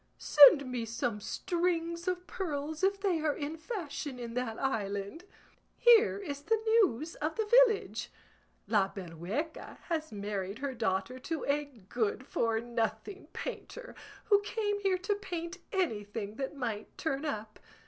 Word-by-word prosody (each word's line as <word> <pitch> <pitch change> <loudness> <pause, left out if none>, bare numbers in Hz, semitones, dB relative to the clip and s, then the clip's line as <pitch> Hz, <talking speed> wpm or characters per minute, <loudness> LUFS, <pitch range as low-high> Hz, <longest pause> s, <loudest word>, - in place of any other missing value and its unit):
Send 285 -1 +8
me 250 -2 -3
some 230 -1 -2
strings 340 - -1
of 360 0 -1
pearls 310 -4 -4
if 395 +1 +2
they 380 -5 +1
are 305 -2 0
in 295 +2 -4
fashion 310 - -5
in 235 -1 -6
that 240 -2 -2
island. 205 - -2 0.5
Here 465 -3 +6
is 290 -8 -5
the 445 +8 +1
news 380 - +3
of 310 +2 -2
the 440 - 0 0.2
village; 440 -3 -3 0.6
La 200 -3 +2
Berrueca 195 - -5
has 315 -2 -1
married 200 -1 -4
her 275 +1 -3
daughter 220 +1 -1
to 320 +3 -3
a 290 +1 +1
good 235 -1 -3
for 225 -3 0
nothing 235 - -3
painter, - - -6 0.3
who 410 -1 +4
came 415 -1 -1
here 390 -2 +2
to 390 +3 0
paint 350 -4 -5
anything 210 - -2
that 270 +2 -3
might 225 -6 -4
turn 280 -2 -2
up. 220 -8 -4
285 Hz, 145 wpm, -31 LUFS, 225-360 Hz, 0.6 s, Send